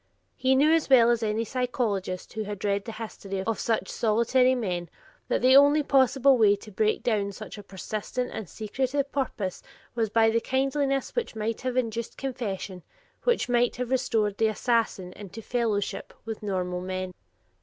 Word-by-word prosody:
He 265 Hz, 0 st, +2 dB
knew 295 Hz, +4 st, +5 dB
as 325 Hz, -3 st, +1 dB
well 240 Hz, -3 st, +7 dB
as 235 Hz, -1 st, +1 dB
any 220 Hz, +1 st, 0 dB
psychologist 225 Hz, -7 st, -2 dB
who 220 Hz, -, -3 dB
has 205 Hz, 0 st, -5 dB
read 200 Hz, -1 st, 0 dB
the 225 Hz, -, -5 dB
history 200 Hz, -3 st, -5 dB
of 225 Hz, +1 st, -2 dB
such 225 Hz, -1 st, 0 dB
solitary 240 Hz, +4 st, +2 dB
men 180 Hz, -8 st, -3 dB, 0.4 s
that -, -, 0 dB
the 260 Hz, +1 st, +6 dB
only 285 Hz, +2 st, +6 dB
possible 270 Hz, -1 st, +4 dB
way 205 Hz, -2 st, +6 dB
to 210 Hz, +1 st, -13 dB
break 215 Hz, +2 st, 0 dB
down 205 Hz, -4 st, 0 dB
such 215 Hz, +3 st, -8 dB
a 210 Hz, -, -8 dB
persistent 215 Hz, +5 st, -4 dB
and 215 Hz, -6 st, -6 dB
secretive 265 Hz, +6 st, -2 dB
purpose, 225 Hz, -9 st, -3 dB, 0.3 s
was 225 Hz, -2 st, 0 dB
by 225 Hz, +1 st, +4 dB
the 230 Hz, +1 st, +1 dB
kindliness 275 Hz, +2 st, 0 dB
which 475 Hz, -, -2 dB
might 220 Hz, +1 st, -2 dB
have 255 Hz, 0 st, -2 dB
induced 230 Hz, -2 st, -2 dB
confession, 205 Hz, -8 st, -4 dB, 0.4 s
which 480 Hz, -, +2 dB
might 245 Hz, 0 st, +2 dB
have 250 Hz, +1 st, -4 dB
restored 220 Hz, -6 st, +1 dB
the 225 Hz, -, +4 dB
future 215 Hz, -, +1 dB
assassin 220 Hz, -6 st, 0 dB
into 205 Hz, +1 st, -9 dB
fellowship 225 Hz, -3 st, -2 dB
with 225 Hz, -1 st, -5 dB
normal 180 Hz, -3 st, -2 dB
men. 185 Hz, 0 st, -4 dB
225 Hz, 175 wpm, -27 LUFS, 205-255 Hz, 0.4 s, well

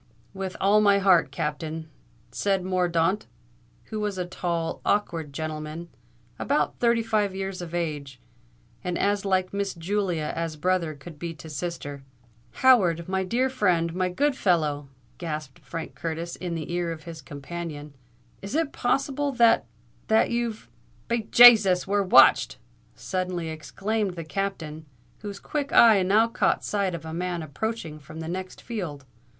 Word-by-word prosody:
"With 190 Hz, -1 st, -5 dB
all 205 Hz, +2 st, +4 dB
my 200 Hz, -1 st, +5 dB
heart, 185 Hz, -7 st, +4 dB
Captain!" 155 Hz, +3 st, -4 dB, 0.4 s
said 195 Hz, -2 st, 0 dB
Mordaunt, 180 Hz, +1 st, +1 dB, 0.6 s
who 215 Hz, -, -3 dB
was 210 Hz, -2 st, -2 dB
a 180 Hz, -, -2 dB
tall, 170 Hz, -2 st, -3 dB
awkward 165 Hz, -7 st, 0 dB
gentleman, 155 Hz, +2 st, -5 dB, 0.5 s
about -, -, 0 dB
thirty 235 Hz, -1 st, +3 dB
five 210 Hz, -3 st, 0 dB
years 195 Hz, -1 st, -4 dB
of 175 Hz, -1 st, -6 dB
age, 145 Hz, -6 st, -3 dB, 0.6 s
and 180 Hz, -1 st, -2 dB
as 205 Hz, 0 st, 0 dB
like 185 Hz, -1 st, +1 dB
Miss 200 Hz, -1 st, -2 dB
Julia 175 Hz, -3 st, -1 dB
as 165 Hz, -1 st, -3 dB
brother 170 Hz, -1 st, 0 dB
could 145 Hz, +2 st, -12 dB
be 170 Hz, 0 st, -5 dB
to 155 Hz, +1 st, -10 dB
sister. 145 Hz, -2 st, -5 dB, 0.5 s
"Howard—my 190 Hz, -7 st, +3 dB
dear 245 Hz, +7 st, +1 dB
friend—my 180 Hz, -7 st, +1 dB
good 285 Hz, +10 st, +1 dB
fellow," 150 Hz, -, +1 dB, 0.3 s
gasped 155 Hz, -5 st, -5 dB
Frank 165 Hz, -1 st, -7 dB
Curtis 165 Hz, +1 st, -4 dB
in 175 Hz, -2 st, -4 dB
the 165 Hz, +1 st, -5 dB
ear 175 Hz, -1 st, -1 dB
of 160 Hz, -1 st, -7 dB
his 165 Hz, -2 st, -9 dB
companion; 150 Hz, 0 st, -7 dB, 0.5 s
"is 195 Hz, +8 st, -5 dB
it 320 Hz, -2 st, +1 dB
possible 275 Hz, +3 st, 0 dB
that—that—you've——" 220 Hz, -, +1 dB, 0.4 s
"Be 235 Hz, -2 st, -1 dB
Jasus! 210 Hz, -7 st, +8 dB
we're 200 Hz, +1 st, +1 dB
watched!" 190 Hz, -, +6 dB, 0.4 s
suddenly 180 Hz, -3 st, -3 dB
exclaimed 190 Hz, +7 st, -3 dB
the 165 Hz, -, -5 dB
Captain, 160 Hz, -3 st, -4 dB, 0.3 s
whose 200 Hz, -1 st, -7 dB
quick 290 Hz, -2 st, -3 dB
eye 220 Hz, -4 st, +7 dB
now 205 Hz, +5 st, +4 dB
caught 230 Hz, -, +1 dB
sight 200 Hz, -4 st, -1 dB
of 160 Hz, -1 st, -8 dB
a 160 Hz, -, -6 dB
man 175 Hz, 0 st, -2 dB
approaching 160 Hz, 0 st, -4 dB
from 155 Hz, +2 st, -11 dB
the 160 Hz, -, -5 dB
next 185 Hz, +2 st, -6 dB
field. 175 Hz, -, -5 dB
180 Hz, 145 wpm, -26 LUFS, 160-205 Hz, 0.6 s, Jasus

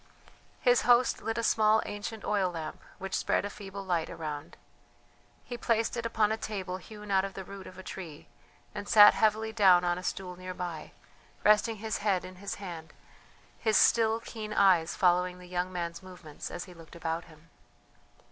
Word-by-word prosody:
His 245 Hz, -2 st, +4 dB
host 245 Hz, 0 st, +4 dB
lit 225 Hz, +1 st, -3 dB
a 230 Hz, -, -1 dB
small 220 Hz, -1 st, +4 dB
ancient 205 Hz, +1 st, -6 dB
oil 200 Hz, -3 st, +1 dB
lamp 165 Hz, -3 st, -6 dB, 0.2 s
which 195 Hz, 0 st, -6 dB
spread -, -, +1 dB
a 205 Hz, -, -4 dB
feeble 200 Hz, -1 st, -8 dB
light 170 Hz, -3 st, 0 dB
around. 150 Hz, -3 st, -6 dB, 0.9 s
He 240 Hz, -1 st, -7 dB
placed 225 Hz, 0 st, +1 dB
it 235 Hz, -1 st, -2 dB
upon 220 Hz, -2 st, +1 dB
a 220 Hz, -, 0 dB
table 190 Hz, -4 st, -4 dB
hewn 210 Hz, +2 st, -10 dB
out 190 Hz, -1 st, +4 dB
of 195 Hz, 0 st, -5 dB
the 190 Hz, -, -5 dB
root 195 Hz, 0 st, -10 dB
of 185 Hz, -, -12 dB
a 190 Hz, -, -9 dB
tree, 170 Hz, -6 st, -8 dB, 0.5 s
and 205 Hz, -1 st, -6 dB
sat 210 Hz, -1 st, +9 dB
heavily 220 Hz, 0 st, +1 dB
down 190 Hz, -5 st, +6 dB
on 175 Hz, 0 st, 0 dB
a -, -, -9 dB
stool 180 Hz, 0 st, -4 dB
near 185 Hz, 0 st, -7 dB
by, 175 Hz, -4 st, -6 dB, 0.5 s
resting 215 Hz, +2 st, +4 dB
his 220 Hz, +1 st, -3 dB
head 200 Hz, -3 st, 0 dB
in 185 Hz, 0 st, -10 dB
his 200 Hz, +2 st, -5 dB
hand, 170 Hz, -5 st, -8 dB, 0.7 s
his 220 Hz, -2 st, +2 dB
still 225 Hz, -1 st, +4 dB
keen 215 Hz, -2 st, -7 dB
eyes 180 Hz, -5 st, +4 dB
following 180 Hz, 0 st, +2 dB
the 180 Hz, -, -12 dB
young 180 Hz, +1 st, -2 dB
man's 170 Hz, -1 st, -4 dB
movements 180 Hz, -5 st, -9 dB
as 175 Hz, -, -5 dB
he 180 Hz, -, -12 dB
looked 165 Hz, -1 st, -14 dB
about 165 Hz, 0 st, -3 dB
him. 160 Hz, -1 st, -19 dB
190 Hz, 185 wpm, -30 LUFS, 180-215 Hz, 0.9 s, sat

